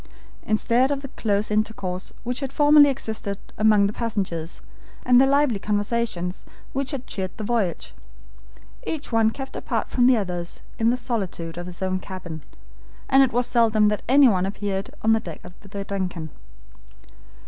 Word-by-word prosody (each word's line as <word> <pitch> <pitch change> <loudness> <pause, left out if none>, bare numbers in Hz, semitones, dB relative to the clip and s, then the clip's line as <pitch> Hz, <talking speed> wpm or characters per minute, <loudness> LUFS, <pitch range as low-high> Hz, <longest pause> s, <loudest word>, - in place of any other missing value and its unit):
Instead 235 +4 +2
of 280 -1 -2
the 275 - -6
close 210 -3 -1
intercourse 205 -4 -2
which 245 +1 -2
had 275 -2 -4
formerly 290 0 +6
existed 220 -6 -4 0.2
among 215 -1 +4
the 200 - -1
passengers, 190 -8 -3 0.5
and 250 0 +6
the 270 - +5
lively 280 -6 +2
conversations 205 -3 -2 0.3
which 270 0 -1
had 270 -4 -2
cheered 190 -2 -3
the 220 - -5
voyage, 210 -6 -1 0.9
each 305 -4 -4
one 225 -1 +4
kept 270 +4 -7
apart - - -2
from 245 -1 +3
the 255 -2 +5
others 175 -4 -4 0.2
in 225 0 +3
the 245 - +2
solitude 190 -9 -3
of 175 +1 -6
his 180 +1 -6
own 185 0 0
cabin, 175 -5 -8 0.7
and 270 - +6
it 265 - +4
was 245 +1 +1
seldom 220 -3 +3
that 210 - -1
anyone 245 -9 +5
appeared 195 -1 -3
on 225 0 +5
the 225 - +3
deck 170 -6 -9
of 180 - -10
the 200 0 -7
DUNCAN. 185 -5 -4
215 Hz, 165 wpm, -24 LUFS, 190-245 Hz, 0.9 s, formerly